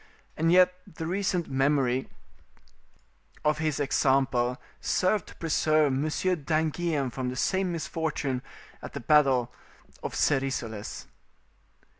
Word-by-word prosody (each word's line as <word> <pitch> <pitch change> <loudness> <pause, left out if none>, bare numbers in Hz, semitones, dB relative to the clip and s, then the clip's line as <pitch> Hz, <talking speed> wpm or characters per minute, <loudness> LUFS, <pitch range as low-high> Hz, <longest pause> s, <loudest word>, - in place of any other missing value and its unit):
And 165 +1 +2
yet 180 0 +6 0.2
the 165 - -6
recent 180 -1 -1
memory 135 -1 +1 1.4
of 150 0 +2
his 155 -3 -1
example 130 -3 +2 0.2
served 185 +1 +1
to - - -13
preserve 155 -3 +2
Monsieur 155 +6 0
d'Anguien 155 -2 -1
from 125 +1 -3
the 125 - -5
same 190 +7 0
misfortune 155 -5 -2 0.4
at - - -8
the 140 - -4
battle 130 -3 +3 0.5
of - - -5
Serisoles. 130 -6 -1
150 Hz, 110 wpm, -28 LUFS, 130-165 Hz, 1.4 s, yet